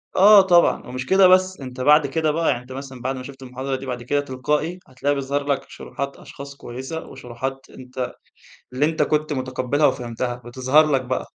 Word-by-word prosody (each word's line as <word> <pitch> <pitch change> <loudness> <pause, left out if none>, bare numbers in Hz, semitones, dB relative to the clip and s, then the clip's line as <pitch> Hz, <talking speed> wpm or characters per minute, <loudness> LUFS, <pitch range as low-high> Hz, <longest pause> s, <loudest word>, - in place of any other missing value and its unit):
آه 205 +2 +8
طبعًا 175 -2 +3
ومش 125 +1 -5
كده 190 +4 +5
بس 185 0 +3
أنت 130 -1 -7
بعد 150 +2 +5
كده 155 +2 0
بقى 165 +2 0
يعني 120 - 0
أنت 125 +1 -15
مثلًا 135 -1 -8
بعد 130 +2 -2
ما 130 - -7
شُفت 135 0 -11
المحاضرة 130 +1 -4
دي، 130 - -7
بعد 125 -2 -5
كده 145 +4 0
تلقائي 150 +6 -2
هتلاقي 140 +3 -1
بيظهر 140 +1 -2
لك 140 -1 -1
شروحات 140 0 -6
أشخاص 140 0 -11
كويسة، 130 +5 -7
وشروحات 130 +3 -6
أنت 125 0 -6 0.6
اللي 135 +4 +2
أنت 155 -1 +1
كنت 150 +1 0
مُتقبلها 130 +2 0
وفهمتها 120 -1 -3
بتظهر 130 +5 +2
لك 135 -2 +2
بقى. 130 +1 -2
135 Hz, 190 wpm, -22 LUFS, 130-150 Hz, 0.6 s, آه